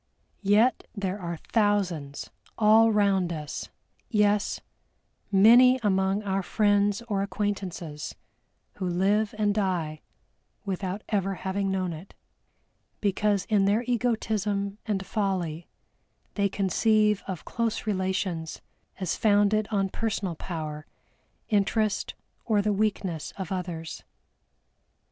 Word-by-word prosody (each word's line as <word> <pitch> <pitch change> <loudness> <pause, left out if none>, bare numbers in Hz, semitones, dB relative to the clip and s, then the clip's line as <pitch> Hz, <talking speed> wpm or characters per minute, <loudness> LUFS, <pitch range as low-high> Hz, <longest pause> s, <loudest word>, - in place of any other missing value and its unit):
Yet 210 +5 +3
there 200 -1 -3
are 170 -1 -4
thousands 185 -10 -1 0.3
all 225 +1 +6
round 195 -4 +2
us, 150 -3 -5 0.4
yes, 210 -2 +2 0.7
many 240 +6 +7
among 190 0 +1
our 195 -1 0
friends 205 +2 +2
or 205 -4 -1
acquaintances, 190 -6 -4 0.6
who 185 - -2
live 200 +4 +1
and 205 -1 +2
die 175 -7 -1 0.6
without 195 +1 -3
ever 195 -2 0
having 195 +2 -2
known 185 -2 -1
it, 165 +5 -11 0.8
because 205 -1 +1
in 205 -3 +2
their 210 +4 +2
egotism 215 -4 -1
and 195 -2 -1
folly 180 -6 -2 0.7
they 200 -1 +1
conceive 210 +2 +2
of 185 -4 -5
close 230 -2 -2
relations 185 -5 -2 0.4
as 185 -4 -1
founded 205 0 +3
on 195 -3 0
personal 205 -4 -2
power, 155 -3 -6 0.6
interest 215 0 +1 0.3
or 210 -3 +2
the 210 0 +1
weakness 195 -6 -1
of 190 -3 -5
others. 175 -3 -4
200 Hz, 110 wpm, -27 LUFS, 185-210 Hz, 0.8 s, many